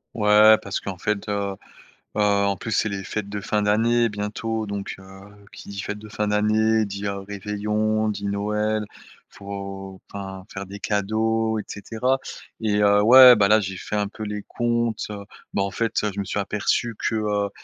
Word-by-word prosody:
Ouais, 105 0 +6
parce 100 - -3
qu'en 95 -2 -6
fait, 105 +3 -2
heu, 100 -1 -1 0.6
heu, - - 0
en 100 -1 +2
plus 110 - -6
c'est 110 - +1
les 95 -2 -5
fêtes 105 0 -4
de 105 0 -4
fin 105 +1 -1
d'année 115 +3 +2
bientôt 110 +2 -3
donc 100 -1 -5
heu, 95 +1 -14 0.2
qui - - -11
dit: 100 -1 -5
«fêtes 105 0 -5
de 110 0 -11
fin 105 0 -2
d'année» 110 +1 +2
dit: 100 0 -6
«heu, 100 0 -3
réveillon», 105 +2 -1
dit 100 -1 -4
«Noël», 105 +1 -1 0.4
faut, 100 -1 -8
enfin 95 -1 -7
faire 95 0 -5
des 100 +2 -9
cadeaux 110 +2 0
et - - -5
cetera 115 +5 -1 0.4
et 105 -2 +1
heu, 100 0 +5
ouais, 125 +2 +10
bah, 100 - +4
là 110 +1 +6
j'ai 95 -1 -4
fait 105 - -5
un 105 -1 0
peu 110 - -8
les 105 -1 -4
comptes, 120 -2 0
heu, 100 -1 -6 0.3
bah 100 - +1
en 100 - -3
fait, 115 -1 -1
heu, 105 - 0
je - - -4
me 100 - -2
suis 100 - -2
aperçu 105 +3 -1
que, 110 - -1
heu, 105 -2 0
105 Hz, 195 wpm, -23 LUFS, 100-110 Hz, 0.6 s, ouais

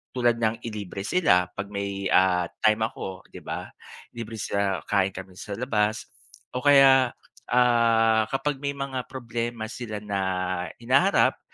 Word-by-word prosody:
tulad 120 -2 +3
ng 115 +1 -1
ilibre 100 -3 -6
sila 90 - +3
'pag 100 0 -6
may, 100 -1 -3
ah, 90 -2 +3 0.2
time 110 +1 +4
ako, 95 -4 -8
di - - -9
ba? - - -5 0.5
Libre 115 -1 -6
sila, 100 -3 -1
kain 100 -2 +2
kami 95 -1 -9
sa 100 - -6
labas 110 -3 -1 0.4
o 125 - -3
kaya, 135 -3 +6 0.3
ah, 115 -3 +3
kapag 135 +1 -2
may 140 0 -3
mga 135 -2 -4
problema 120 -2 -4
sila 110 -4 -6
na 100 -1 -2 0.6
hinaharap, 135 +11 +3
115 Hz, 140 wpm, -25 LUFS, 100-125 Hz, 0.6 s, kaya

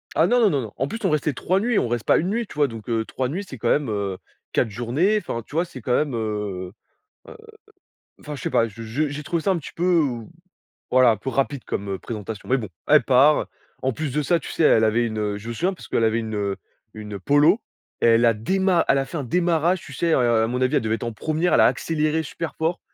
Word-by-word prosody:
Ah, - - +4
non, 245 0 +3
non, 220 - +5
non, 145 -6 0
non. 110 -4 -7
En 135 - -1
plus, 225 - -5
on 190 - +2
restait 150 -1 0
3 185 +9 0
nuits. 235 +1 +1
On - - 0
reste 120 -1 -2
pas - - +4
1 175 - 0
nuit, 230 +2 -1
tu - - -12
vois? 145 -1 +3
Donc 115 -4 -9
heu, 115 -1 +1
3 130 +2 -3
nuits, 180 +8 -3
c'est 130 - -8
quand 115 +1 -1
même, 145 -5 +1
heu, 100 -3 -2 0.4
4 115 - +2
journées. 125 - +1
Enfin, 145 - -4
tu - - -12
vois? 170 +2 +2
C'est 130 -7 -11
quand 125 - -1
même, 145 +1 +1
heu 105 -5 -3 0.6
heu, 460 - -11 0.8
enfin 150 -1 -7
je - - -9
sais - - -1
pas, 115 - +2
je 115 +1 -11
je 125 +8 -1
j'ai 145 +1 -6
trouvé 170 +3 -1
ça 195 - +1
un 185 - +1
petit 160 - -8
peu, 170 - -4
heu, 145 -10 +1 0.7
voilà, 130 -1 +6
un 110 - +1
peu 120 +6 -5
rapide 135 -1 -1
comme 100 -1 -3
présentation, 110 -2 -7
mais 135 - +3
bon, 110 -6 -5 0.2
elle 150 0 +6
part. 140 +4 +4 0.4
En 130 - +1
plus 150 +2 -4
de 150 - 0
ça, 170 +4 +2
tu - - -8
sais, - - -1
elle 110 - +5
avait 115 +2 +2
une, 110 -1 -4
heu, 105 -1 -2
je 105 - -12
me - - -3
souviens 175 +11 0
parce - - -12
qu'elle - - 0
avait 110 +1 +2
une, 110 -1 -4
heu, 100 -2 -1 0.4
une 105 -2 -7
Polo 150 - +4 0.4
et - - +3
elle 115 +1 +5
a 115 -1 +5
déma 185 - +1
elle 135 - +4
a 135 - 0
fait 135 - -7
un 150 - -2
démarrage, 170 +4 +1
tu 145 - -12
sais, 165 +5 -1
heu - - +3
heu, 120 -3 +3
à - - +2
mon 125 +2 -2
avis, 130 0 +1
elle - - +2
devait 110 0 0
être - - -14
en 115 - -3
1re, 155 +9 0
elle - - +5
a - - +7
accéléré 155 0 0
super 165 +1 -5
fort 160 +2 -1
130 Hz, 275 wpm, -23 LUFS, 115-160 Hz, 0.8 s, a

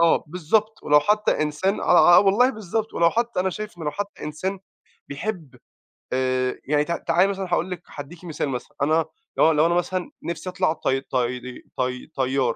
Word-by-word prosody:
آه 170 -1 +4
بالضبط، 210 +6 0
ولو 150 0 +5
حتّى 210 0 +2
إنسان 155 +7 -1
آه، 175 0 +6
آه، - - +7
والله 205 +6 +4
بالضبط، 220 -1 -3
ولو 170 0 +4
حتّى 235 -4 0
أنا 190 - 0
شايف 210 -1 -7
إن - - -8
لو 150 - 0
حتّى 205 +3 -6
إنسان 185 +6 -3 0.5
بيحب 150 - -5 0.6
آآ 130 0 0
يعني 150 +1 +2
ت 170 - -5 0.2
تعالي 185 +3 +4
مثلًا 195 -1 -3
هاقول 180 +2 0
لِك 180 -1 -5
هادِّيكِ 160 +5 -9
مثال 155 -3 -3
مثلًا، 125 -2 -6
أنا 155 +2 +3 0.3
لو 160 - +5
لو 155 +1 +3
أنا 170 - +2
مثلًا 180 +1 -1
نِفْسي 170 +2 -4
أطلع 180 -3 +1
طي 135 -4 -1
طي 125 -1 -3 0.2
طي 125 0 -2
طيار، 130 -4 0
170 Hz, 185 wpm, -23 LUFS, 140-190 Hz, 0.6 s, آه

